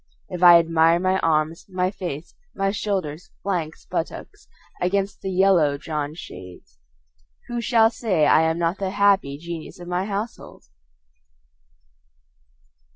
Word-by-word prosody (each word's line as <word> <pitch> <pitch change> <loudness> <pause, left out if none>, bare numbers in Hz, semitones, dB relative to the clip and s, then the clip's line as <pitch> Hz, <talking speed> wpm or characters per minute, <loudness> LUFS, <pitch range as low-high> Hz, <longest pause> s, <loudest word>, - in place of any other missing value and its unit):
If 180 -1 -6
I 175 -1 +9
admire 165 0 +3
my 185 +1 +1
arms, 160 0 0
my 185 0 -1
face, 170 -5 -6 0.2
my 195 0 0
shoulders, 185 -6 -3
flanks, 170 -5 -3
buttocks - - -5 0.3
against 195 +2 -1
the 190 - -4
yellow 180 -6 +3
drawn 150 0 -4
shades, 90 - -12 0.7
Who 240 0 -2
shall 225 -1 +4
say 190 -10 +1
I 155 - +5
am 160 0 +1
not 170 +2 -1
the 195 -1 -1
happy 195 -8 +2
genius 170 +3 -8
of 175 - -10
my 180 +1 -1
household? 210 +3 -6
175 Hz, 130 wpm, -23 LUFS, 160-195 Hz, 0.7 s, I